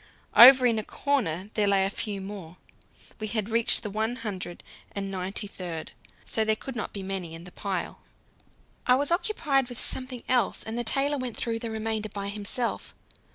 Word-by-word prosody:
Over 255 +1 +10
in 230 -3 +3
a - - -4
corner 210 - -1
there 210 -2 +2
lay 195 -1 +3
a 195 - -1
few 205 -1 -4
more; 190 -4 -8 0.6
we 215 - -3
had 215 0 -2
reached 230 0 +5
the 210 - -3
one 220 +3 -1
hundred 190 -7 -6 0.3
and 195 -1 -3
ninety 190 +2 -3
third, 175 -5 -6 0.3
so 220 - 0
there 220 0 +2
could 265 +4 -8
not 230 - -4
be 200 - -5
many 190 -4 -4
in 165 - -10
the 180 - -11
pile. 190 -2 -4 0.9
I 250 - +6
was 285 +4 0
occupied 305 - +1
with 245 - -6
something 255 -2 -3
else, 245 -5 +1
and 220 - -5
the 240 - -1
tailor 275 +5 +2
went 250 -3 -4
through 230 -1 -2
the 230 - -4
remainder 220 -1 -2
by 200 0 -5
himself. 210 +4 -3
215 Hz, 190 wpm, -27 LUFS, 195-245 Hz, 0.9 s, Over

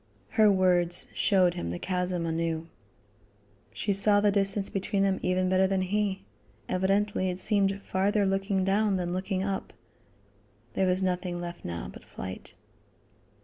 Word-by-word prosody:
Her 215 -2 +4
words 180 -2 +3
showed 185 -3 +3
him 85 - -4
the 85 - -3
chasm 180 - -2
anew. 165 0 -2 1.0
She 205 - -1
saw 205 +1 +4
the 205 0 +3
distance 195 0 +2
between 195 0 -1
them 195 -1 +1
even 185 0 +1
better 185 +1 +3
than 190 -1 0
he. 200 - -1 0.4
Evidently 190 +1 +1
it 180 0 -4
seemed 200 -2 +1
farther 200 +2 +1
looking 195 0 0
down 200 +1 +2
than 175 -1 -2
looking 185 +1 -2
up. 195 -1 -3 1.0
There 190 - +1
was 185 +1 +2
nothing 180 -1 -1
left 175 0 -7
now 85 -8 -5
but 60 - -12
flight. 95 0 -8
190 Hz, 145 wpm, -28 LUFS, 180-195 Hz, 1.0 s, Her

